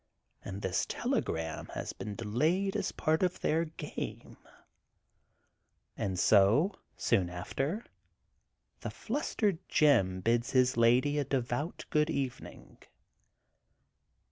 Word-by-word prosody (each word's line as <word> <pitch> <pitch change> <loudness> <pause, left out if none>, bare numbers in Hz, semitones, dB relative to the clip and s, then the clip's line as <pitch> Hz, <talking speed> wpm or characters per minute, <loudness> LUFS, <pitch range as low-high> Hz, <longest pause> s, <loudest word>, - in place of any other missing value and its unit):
And 100 +1 -6
this 95 - 0
telegram 80 -1 -2
has - - -4
been 105 - -6
delayed 155 - 0
as - - -1
part 155 +1 +1
of 180 -1 0
their 165 +2 +2
game. 160 - -7 0.5
' - - -46 0.2
* - - -48
And 95 -2 -2
so, 110 - +5 0.2
soon 90 -3 +2
after, 135 - -3 0.9
the - - -4
flustered 215 - -1
Jim 95 -12 +3
bids 120 +5 +1
his 130 -1 +4
lady 125 +5 +4
a - - +1
devout 130 +4 -2
good 150 -1 +3
evening. 135 -5 -5
130 Hz, 115 wpm, -31 LUFS, 100-160 Hz, 0.9 s, so